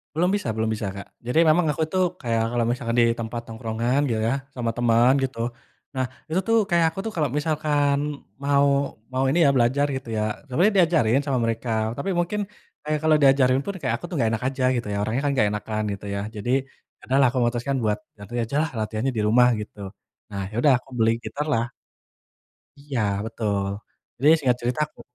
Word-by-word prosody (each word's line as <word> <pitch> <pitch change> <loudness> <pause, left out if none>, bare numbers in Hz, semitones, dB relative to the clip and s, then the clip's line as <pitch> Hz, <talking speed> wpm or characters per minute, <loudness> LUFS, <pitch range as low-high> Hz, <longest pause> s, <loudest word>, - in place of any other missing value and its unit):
Belum 175 +3 +2
bisa 205 -9 -1
belum 110 0 0
bisa 110 -1 -2
Kak. 100 - -8 0.2
Jadi 125 +6 +1
memang 165 +2 +4
aku 160 - -2
tuh 185 0 +3 0.2
kayak 115 -2 0
kalau 120 - +2
misalkan 120 -1 -2
di - - +5
tempat 115 +1 -4
tongkrongan 115 +3 -1
gitu 110 -3 -1
ya, 115 +3 +1 0.2
sama 120 -2 -1
teman 120 +1 +4
gitu. 130 -3 -2 0.6
Nah 130 -1 0 0.2
itu 170 - +1
tuh 225 - +4
kayak 170 -1 +4
aku - - -10
tuh 220 - -3
kalau 155 -3 +2
misalkan 150 -2 +1 0.4
mau 140 0 +3 0.5
mau 130 +1 0
ini 165 - +2
ya, 140 - +5
belajar 130 +4 +3
gitu 130 -2 -7
ya, 105 - 0 0.2
sebenernya 175 +11 +2
diajarin 155 -9 +4
sama 135 -3 +1
mereka, 115 +1 -2 0.3
tapi 195 +8 -2
mungkin 175 +5 0 0.4
kayak 150 0 -1
kalau 155 -1 +4
diajarin 135 -2 +5
pun 200 - -4
kayak 130 - 0
aku - - -17
tuh 175 - -7
enggak 115 -5 +2
enak - - -18
aja 130 -1 -2
gitu 120 - -3
ya, - - -1
orangnya 110 +5 -1
kan - - +2
enggak 110 -6 +3
enakan 105 +1 -3
gitu 100 - -7
ya. 100 - -2 0.2
Jadi, 105 +4 -3 0.5
ya - - -41
udahlah, 135 0 +5
aku 130 - -7
memutuskan 120 +3 0
buat 105 -1 +1 0.2
nanti 105 +2 -11
ajalah 145 +7 0
latihannya 110 +4 -1
di 110 - +1
rumah 125 +3 +5
gitu. 105 0 -9 0.5
Nah 100 - -4
iya 100 - -10
sudah 145 - +6
aku 130 - -23
beli 115 0 +4
gitar 150 +1 -4
lah. 115 -2 +2 1.2
Iya 140 -4 -3 0.3
betul. 105 -3 -1 0.6
Jadi 145 +5 +5
singkat 125 -4 +1
cerita, 120 +3 -2
aku 155 - -20
125 Hz, 200 wpm, -24 LUFS, 115-145 Hz, 1.2 s, sudah